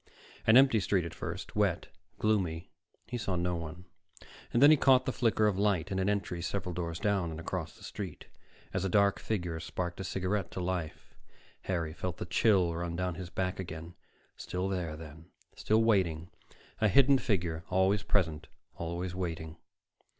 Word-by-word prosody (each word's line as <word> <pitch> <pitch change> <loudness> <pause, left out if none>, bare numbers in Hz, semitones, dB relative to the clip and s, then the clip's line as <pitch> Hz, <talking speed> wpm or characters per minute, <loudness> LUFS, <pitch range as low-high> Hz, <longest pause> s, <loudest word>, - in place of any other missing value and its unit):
An 110 +2 +8
empty 130 -4 +6
street 95 -3 +1
at 85 - -6
first, 85 +4 -6
wet, 100 -5 +1 0.3
gloomy. 95 -7 0 0.3
He 120 - -4
saw 100 -4 -1
no 90 0 0
one. 85 +2 -7 0.7
Then 140 +5 +7
he - - +8
caught 130 -3 +5
the - - 0
flicker 115 -3 +2
of 100 -2 +1
light 100 -3 +1
in 95 - 0
an 95 +1 +1
entry 100 -4 -1
several 90 +1 -3
doors 85 -1 -3
down 100 -3 0
and 80 0 -6
across 85 - -4
the - - -16
street, 95 -7 -7 0.5
as - - -1
a 95 - 0
dark 100 +1 +3
figure 90 -6 -2
sparked 85 +3 -4
a - - -3
cigarette 95 +2 -1
to - - -4
life. 90 -3 -4 0.5
Harry 85 -4 -1
felt 90 +1 -4
the - - -4
chill 90 -2 +3
run 85 0 -3
down 90 0 -1
his 85 +1 -7
back 95 0 -2
again. 85 -2 -6 0.4
Still 90 +1 -3
there, 90 -5 -3
then, 80 +1 -11 0.3
still 110 +1 +2
waiting, 85 -7 +1 0.5
a 110 - +4
hidden 135 +6 +5
figure, 85 -8 -1
always 95 +2 +3
present, 80 -8 0 0.3
always 85 +2 -3
waiting.... 80 -3 -4
90 Hz, 170 wpm, -31 LUFS, 85-100 Hz, 0.7 s, An